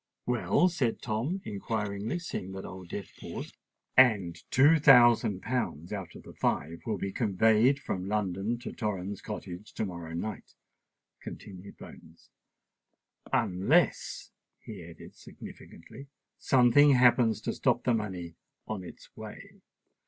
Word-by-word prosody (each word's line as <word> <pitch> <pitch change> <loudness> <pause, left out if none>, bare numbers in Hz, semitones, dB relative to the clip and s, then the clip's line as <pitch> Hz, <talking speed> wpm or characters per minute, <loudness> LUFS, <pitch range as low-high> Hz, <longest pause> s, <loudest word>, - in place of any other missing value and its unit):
"Well?" 125 +8 +2
said 135 -10 -1
Tom 125 - -2
inquiringly, 105 - -3
seeing 95 - -6
that 95 - -7
Old 95 -2 -9
Death 100 -4 -6
paused. - - -7 0.4
"And 105 -10 +5
two 150 +5 +5
thousand 120 -8 +6
pounds 105 - -3
out 95 -4 -6
of - - -11
the - - -12
five 80 +3 -1
will 110 -2 -1
be 95 +1 -3
conveyed 110 +5 +3
from 95 -8 -4
London 105 +2 -1
to - - -6
Torrens 100 -3 -4
Cottage 105 -2 -7
to - - -2
morrow 85 -3 -7
night," 105 +6 -6 0.7
continued 95 -1 -10
Bones: 80 +1 -15 1.0
"unless," 120 - +1 0.3
he 100 -6 -9
added 85 0 -13
significantly, 130 +12 -12 0.3
"something 135 +3 +5
happens 120 -3 +4
to - - -2
stop - - +1
the 125 - +2
money 95 -6 -3 0.3
on 105 -4 -5
its 90 - -13
way." - - -11
105 Hz, 130 wpm, -29 LUFS, 95-125 Hz, 1.0 s, thousand